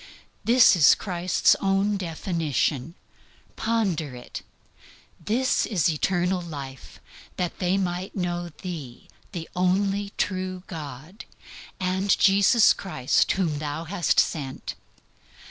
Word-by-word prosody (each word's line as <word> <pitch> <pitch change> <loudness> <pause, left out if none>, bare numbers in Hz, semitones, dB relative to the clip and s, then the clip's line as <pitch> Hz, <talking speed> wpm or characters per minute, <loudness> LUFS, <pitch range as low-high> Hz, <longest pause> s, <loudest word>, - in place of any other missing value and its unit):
This 240 -3 +6
is 155 -7 +6
Christ's 180 -2 +2
own 195 +1 +1
definition. 165 -5 -2 0.6
Ponder 190 - -1
it. 125 - -8 0.8
"This 245 +8 +1
is 190 -8 +1
life - - +1
eternal, 180 +3 0 1.0
that 180 -2 -3
they 185 +1 +1
might 180 0 -3
know 175 -2 -2
Thee 155 -10 -7 0.2
the 170 -5 -6
only 195 +2 +1
true 185 -1 -2
God, 155 - -9 0.5
and 190 +1 +1
Jesus 200 +3 +5
Christ 130 -10 0
whom 165 -7 -1
Thou 150 +1 -4
hast 175 +1 +1
sent." 135 -4 -2
180 Hz, 105 wpm, -25 LUFS, 160-195 Hz, 1.0 s, This